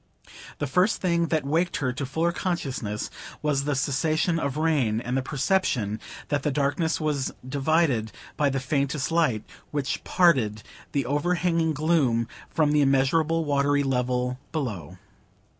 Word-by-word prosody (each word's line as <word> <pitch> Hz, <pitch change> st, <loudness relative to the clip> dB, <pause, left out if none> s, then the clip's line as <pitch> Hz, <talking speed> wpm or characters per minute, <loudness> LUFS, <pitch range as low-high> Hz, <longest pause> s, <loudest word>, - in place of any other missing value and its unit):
The -, -, -2 dB
first 180 Hz, -, +2 dB
thing 170 Hz, -2 st, +1 dB
that 155 Hz, -3 st, 0 dB
waked 165 Hz, +5 st, +1 dB
her 130 Hz, -5 st, -1 dB
to 135 Hz, +1 st, -4 dB
fuller 165 Hz, +5 st, 0 dB
consciousness 135 Hz, -, -3 dB, 0.3 s
was 140 Hz, -2 st, +1 dB
the 145 Hz, -1 st, 0 dB
cessation 155 Hz, +5 st, +1 dB
of 140 Hz, -3 st, -2 dB
the 155 Hz, -, -1 dB
rain, 135 Hz, -9 st, +2 dB
and 125 Hz, +1 st, -3 dB
a 135 Hz, -, +1 dB
perception 135 Hz, -, 0 dB, 0.3 s
that 145 Hz, -1 st, +1 dB
the 150 Hz, -, 0 dB
darkness 145 Hz, +3 st, 0 dB
was 150 Hz, -4 st, -1 dB, 0.2 s
divided 140 Hz, -5 st, +1 dB, 0.2 s
by 145 Hz, -1 st, +2 dB
the 135 Hz, 0 st, -1 dB
faintest 140 Hz, +2 st, -1 dB
light, 155 Hz, -11 st, +2 dB, 0.3 s
which 145 Hz, -2 st, -2 dB
parted 130 Hz, -, +3 dB, 0.3 s
the 140 Hz, -3 st, 0 dB
overhanging 165 Hz, +3 st, +1 dB
gloom 140 Hz, -7 st, +2 dB, 0.2 s
from 155 Hz, -2 st, +2 dB
the 150 Hz, 0 st, +4 dB
immeasurable 150 Hz, +4 st, +2 dB
watery 145 Hz, 0 st, +2 dB
level 125 Hz, -1 st, 0 dB
below. 115 Hz, -, -4 dB
145 Hz, 145 wpm, -26 LUFS, 130-160 Hz, 0.3 s, the